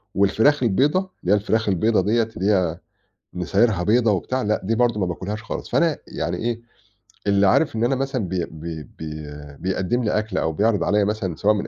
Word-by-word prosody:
والفراخ 110 +9 +3
البيضا، 135 - +3
اللي 185 - -4
هي - - +5
الفراخ 110 +1 0
البيضا 110 +4 +2
دِيَّة 115 +3 +2
اللي 100 +3 +2
هي 90 -5 +1 0.6
نسايرها 95 +2 +1
بيضا 110 +3 +3
وبتاع، 130 +7 -1
لأ، 105 -1 0
دي 110 +4 0
برضه 120 -2 +2
ما 95 - +1
باكلهاش 100 +5 -4
خالص. - - -6
فأنا 165 -3 +2
يعني 85 +1 -3
إيه، 115 +2 -2 0.7
اللي 100 0 +4
عارف 145 +8 +3
إن 110 - 0
أنا 125 +3 +2
مثلًا 130 -6 -2
بي 90 -1 -1
بي 80 0 -7
بي 75 0 -8 0.4
بيقدّم 95 +6 -1
لي 105 - 0
أكل 110 +1 -4
أو 80 - +1
بيعرِض 105 +3 +2
عليَّ 105 0 +2
مثلًا 105 -5 -2
سواء 105 +6 +3
من 105 -1 -3
105 Hz, 195 wpm, -22 LUFS, 95-115 Hz, 0.7 s, هي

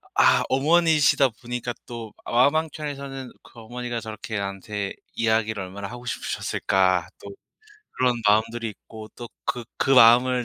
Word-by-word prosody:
아 - - +5
어머니시다 150 -1 +4
보니까 120 +1 -5
또 115 -3 -8
마음 130 +6 +3
1 160 0 -1
켠에서는 140 -3 -6
그 120 - -16
'어머니가 120 0 -5
저렇게 110 +1 -6
나한테 100 0 -4 0.2
이야기를 110 -2 0
얼마나 100 +2 -7
하고 120 +3 -10
싶으셨을까.' 95 -6 0 0.2
또 100 - -8 0.7
그런 125 -1 +3
마음들이 110 +2 +2
있고 110 +1 -12
또 120 -2 -8 0.2
그 120 -1 -2
그 135 - 0
마음을 125 +1 +6
120 Hz, 320 characters per minute, -24 LUFS, 110-130 Hz, 0.7 s, 마음을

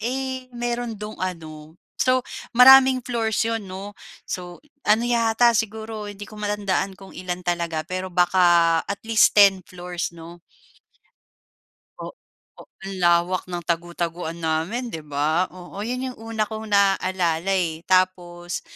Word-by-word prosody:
Eh, 260 +2 -3
meron 240 -1 -3
do'ng 210 0 -8
ano, 160 -3 -6 0.2
so, 255 -1 +2 0.3
maraming 260 0 +8
floors 225 -2 0
'yon, 225 -4 -3
'no. 195 +2 -7 0.3
So, 180 +5 -7 0.2
ano 220 +3 +4
yata 235 0 +3
siguro 220 -1 -3
hindi 205 0 -8
ko 210 0 -12
matandaan 200 -2 -1
kung 195 0 -14
ilan 180 -1 -6
talaga 170 -2 -2
pero 185 +1 -4
baka 175 -2 +4
at 200 - -2
least 225 -1 +4
ten 195 -2 +6
floors, 180 -1 -5
'no. 170 +1 -12 1.6
Oo, - - -8 0.7
ang 195 0 -5
lawak 175 +1 +2
ng 175 -1 -4
tago-taguan 170 0 -3
namin, 165 +10 -2
'di 160 -1 -6
ba? 150 +4 0
Oo 185 +2 -10
yun 250 +2 -3
yung - - -19
una 225 -1 -2
kong 220 0 -6
naaalala 190 -3 +1
eh. 165 -3 -1
Tapos 175 -2 0
190 Hz, 135 wpm, -23 LUFS, 175-220 Hz, 1.6 s, maraming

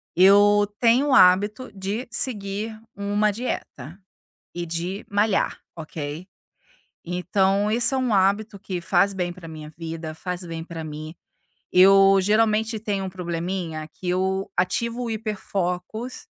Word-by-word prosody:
Eu 205 +2 +6
tenho 240 +5 +3
o - - +3
hábito 205 +7 +4
de 200 +5 -4
seguir 215 -2 -3 0.2
uma 205 +1 0
dieta 200 - -5 0.6
e 175 0 -4
de 175 +5 -4
malhar, 205 0 +1 0.2
ok? 155 +1 -6 0.8
Então 190 +3 +1
esse 240 +5 +2
é - - +1
um 255 -4 0
hábito 200 +2 +2
que 185 -3 -4
faz 200 +3 +2
bem 180 -2 -2
pra 175 -2 -11
minha 155 -1 -9
vida, 165 -1 -6
faz 180 +2 -5
bem 165 -1 -6
pra 165 -1 -7
mim. 155 0 -7 0.6
Eu 195 +1 +7
geralmente 215 +2 +2
tenho 205 -3 -2
um 190 - -4
probleminha 170 -2 -4
que 185 - -9
eu 190 +1 0
ativo 235 +7 -1
o 235 - -3
hiperfocos 215 +1 -4
195 Hz, 135 wpm, -24 LUFS, 175-215 Hz, 0.8 s, Eu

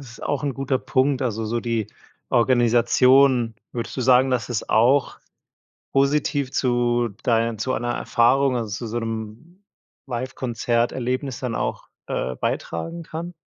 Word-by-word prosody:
es 135 -4 -11
ist - - -13
auch 145 -3 -2
'n 145 -2 -1
guter 135 0 -1
Punkt. 130 +1 +1
Also, 115 -2 -2
so 115 +2 -1
die 115 -3 -1 0.4
Organisation, 120 +1 +4 0.2
würdest 120 +1 -5
du - - -2
sagen, 130 +1 +4
dass 125 -4 -1
es 120 -3 -3
auch 125 +5 +3 0.7
positiv 140 0 +1
zu 120 -1 +1
dein 115 -2 +1
zu 130 +3 -1
einer 120 -1 -1
Erfahrung, 125 +3 +2
also, 115 -2 -3
zu 110 +4 -5
so' 115 +2 -3
nem 115 - -7 0.4
Livekonzert-Erlebnis 125 +1 -2
dann 125 -3 -3
auch, - - -3 0.2
äh, 65 - -3
beitragen 165 - -3
kann? 165 +2 -7
125 Hz, 145 wpm, -23 LUFS, 115-135 Hz, 0.7 s, Organisation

